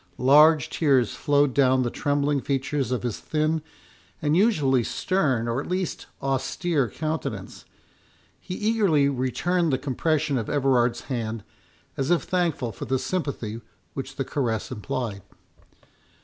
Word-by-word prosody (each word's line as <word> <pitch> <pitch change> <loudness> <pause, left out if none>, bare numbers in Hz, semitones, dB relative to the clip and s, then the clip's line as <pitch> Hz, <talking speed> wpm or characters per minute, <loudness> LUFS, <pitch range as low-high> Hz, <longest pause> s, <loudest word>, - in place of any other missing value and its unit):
Large 150 +3 +5
tears 135 -7 +2
flowed 145 -2 +2
down 130 -1 +3
the 120 - -2
trembling 145 -1 0
features 135 -1 -1
of 125 - -1
his 120 -4 -3
thin, 155 +1 0 0.6
and 150 0 +1
usually 150 - +3
stern, 135 - 0
or 120 +3 -1
at - - -8
least 185 -1 -3 0.2
austere 135 +1 0
countenance; 155 0 -4 0.7
he 180 - -6
eagerly 205 -10 +2
returned 155 +6 0
the 130 - +2
compression 145 +1 0
of 110 - -5
Everard's 130 -4 +2
hand, 115 -4 -4 0.5
as 135 0 -1
if 175 -1 +3
thankful 170 -10 -1
for 95 - -7
the 130 +2 0
sympathy 125 -9 -3 0.3
which 135 0 -6
the 135 - -2
caress 120 -6 -2
implied. 105 -2 -4
140 Hz, 135 wpm, -25 LUFS, 125-155 Hz, 0.7 s, Large